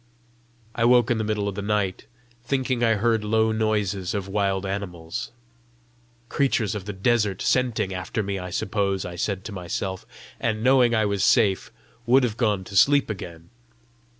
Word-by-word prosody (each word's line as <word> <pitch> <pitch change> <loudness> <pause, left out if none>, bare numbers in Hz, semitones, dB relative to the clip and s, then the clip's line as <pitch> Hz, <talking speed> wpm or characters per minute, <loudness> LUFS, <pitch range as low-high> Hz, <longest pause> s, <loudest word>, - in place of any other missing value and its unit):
I 115 - -1
woke 120 -1 +4
in 115 - +1
the - - 0
middle 105 -1 -1
of 100 - -2
the 100 - -5
night, 100 -2 -1 0.4
thinking 130 -1 -1
I 115 -1 +4
heard 110 +1 +1
low 110 +1 +2
noises 105 -4 -1
of 100 -2 -3
wild 100 -1 0
animals. 90 -4 -5 1.0
"Creatures 120 -6 0
of 105 -3 -5
the 105 - -4
desert 105 -1 +1
scenting 120 -7 0
after 90 +4 -3
me, 100 -1 -3
I 90 0 -6
suppose!" 100 0 -1
I 90 - -6
said 95 +2 -2
to - - -7
myself, 95 0 -4 0.3
and, 110 -1 -1
knowing 125 -2 +4
I 110 -1 +2
was 100 -1 0
safe, 105 -6 +3 0.4
would 130 +2 +5
have 115 -4 0
gone 105 -5 0
to 100 - -10
sleep 140 +3 +4
again. 85 -4 -9
105 Hz, 170 wpm, -24 LUFS, 95-115 Hz, 1.0 s, would